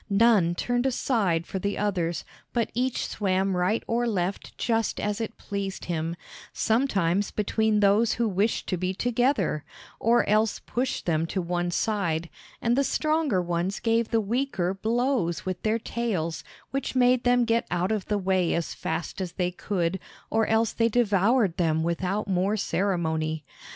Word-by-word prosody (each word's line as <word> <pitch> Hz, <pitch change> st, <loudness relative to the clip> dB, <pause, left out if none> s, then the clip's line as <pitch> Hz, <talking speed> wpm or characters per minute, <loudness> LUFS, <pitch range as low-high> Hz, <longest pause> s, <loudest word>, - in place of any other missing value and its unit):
None 200 Hz, -5 st, +4 dB
turned 245 Hz, +6 st, 0 dB
aside 205 Hz, -10 st, +1 dB
for 190 Hz, -, -4 dB
the 200 Hz, +2 st, -2 dB
others, 175 Hz, -6 st, -1 dB, 0.3 s
but 235 Hz, -2 st, 0 dB
each 250 Hz, +1 st, 0 dB
swam 190 Hz, -2 st, 0 dB
right 180 Hz, +5 st, +1 dB
or 240 Hz, +1 st, 0 dB
left 195 Hz, -3 st, -2 dB
just 225 Hz, -2 st, 0 dB
as 210 Hz, +1 st, -1 dB
it 225 Hz, -, -5 dB
pleased 200 Hz, -1 st, -4 dB
him, 165 Hz, -1 st, -2 dB, 0.4 s
sometimes 205 Hz, -6 st, +1 dB
between 215 Hz, 0 st, +1 dB
those 210 Hz, +3 st, +4 dB
who 235 Hz, -1 st, 0 dB
wished 205 Hz, +3 st, 0 dB
to 185 Hz, -, 0 dB
be 185 Hz, +2 st, -2 dB
together, 245 Hz, -, +1 dB, 0.4 s
or 235 Hz, +2 st, +3 dB
else 215 Hz, +1 st, +2 dB
pushed 255 Hz, +2 st, -3 dB
them 165 Hz, -1 st, +1 dB
to 190 Hz, -, -2 dB
one 175 Hz, 0 st, -1 dB
side, 170 Hz, -4 st, -1 dB, 0.3 s
and 235 Hz, +1 st, +3 dB
the 275 Hz, -, +3 dB
stronger 305 Hz, -, +1 dB
ones 175 Hz, +3 st, -1 dB
gave 230 Hz, 0 st, +1 dB
the 230 Hz, -, +2 dB
weaker 220 Hz, -4 st, -1 dB
blows 225 Hz, -4 st, 0 dB
with 185 Hz, -1 st, -3 dB
their 220 Hz, +1 st, +1 dB
tails, 205 Hz, -9 st, -2 dB, 0.3 s
which 275 Hz, 0 st, -3 dB
made 250 Hz, -1 st, +4 dB
them 245 Hz, 0 st, +4 dB
get 230 Hz, 0 st, +1 dB
out 175 Hz, +3 st, 0 dB
of 215 Hz, -3 st, -1 dB
the 210 Hz, -, +1 dB
way 185 Hz, -2 st, +1 dB
as 170 Hz, -, -2 dB
fast 165 Hz, +4 st, -4 dB
as 180 Hz, -2 st, -4 dB
they 180 Hz, -1 st, -1 dB
could, 180 Hz, -1 st, -2 dB, 0.3 s
or 225 Hz, -1 st, +2 dB
else 225 Hz, 0 st, +2 dB
they 230 Hz, 0 st, +2 dB
devoured 210 Hz, -3 st, +2 dB
them 160 Hz, -2 st, +1 dB
without 185 Hz, +5 st, -1 dB
more 195 Hz, +3 st, +1 dB
ceremony. 160 Hz, -6 st, -1 dB
200 Hz, 160 wpm, -26 LUFS, 175-230 Hz, 0.4 s, None